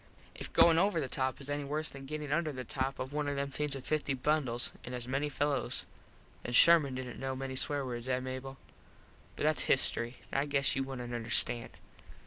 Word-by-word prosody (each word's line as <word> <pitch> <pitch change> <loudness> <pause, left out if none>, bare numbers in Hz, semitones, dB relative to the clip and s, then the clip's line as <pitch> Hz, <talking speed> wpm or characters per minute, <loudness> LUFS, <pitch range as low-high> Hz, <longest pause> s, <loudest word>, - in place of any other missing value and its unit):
If - - -7
goin 165 -1 +6
over 195 -2 +2
the 140 - -1
top 130 0 -2
is 140 - -7
any 145 0 -2
worse 150 +3 -1
than 135 -1 -10
gettin 150 -1 -5
under 155 0 +1
the 130 -2 -6
top 135 +1 -2
of 130 +2 -5
one 150 -1 -1
of 145 - -1
them 140 0 -2
things 150 0 -2
with 135 - -8
fifty 150 -3 0
bundles 130 -3 0
an 125 - -6
as 120 0 -4
many 135 +3 -1
fellos 145 0 -1 0.6
then 120 - -5
Sherman 150 -1 +6
didnt 130 -1 -6
know 135 0 -3
many 130 0 -5
swear 140 +1 0
words, 120 0 -5
eh 125 0 +1
Mable? 130 +1 -6 0.8
But - - -4
thats 155 0 +4
history. 120 -2 +2 0.2
I 140 +2 +1
guess 140 -3 +2
you 135 - 0
wouldnt 125 -3 -6
understand. 120 0 +2
135 Hz, 205 wpm, -32 LUFS, 130-145 Hz, 0.8 s, goin